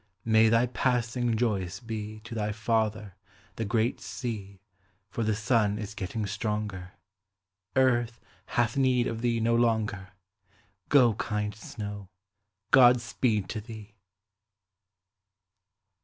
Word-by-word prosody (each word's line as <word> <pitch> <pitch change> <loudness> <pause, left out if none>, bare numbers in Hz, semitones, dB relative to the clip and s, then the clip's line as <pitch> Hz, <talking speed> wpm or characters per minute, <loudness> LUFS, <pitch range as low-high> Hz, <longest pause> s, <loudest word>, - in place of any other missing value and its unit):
May 110 0 +5
thy 115 +2 +4
passing 120 -1 0
joyous 100 -5 -1
be 110 -2 -6
To 120 +1 -9
thy 105 -2 -1
father, 110 -2 -1 0.4
the 115 - -3
great 115 +2 0
sea, 100 -6 -6 0.5
For 115 - -2
the 110 -1 +1
sun 105 -1 +1
is 105 0 -6
getting 105 0 -4
stronger; 105 -3 -3 0.8
Earth 120 -3 +2 0.4
hath 120 -1 +2
need 130 -3 +3
of 115 -1 -3
thee 120 -1 +1
no 115 +1 +2
longer; 110 -5 0 0.8
Go, 125 -6 +6
kind 105 0 -2
snow, 105 -2 -7 0.6
God 125 -2 +7
speed 115 -4 -1
to 110 - -4
thee! 110 -2 -11
110 Hz, 115 wpm, -28 LUFS, 105-120 Hz, 0.8 s, God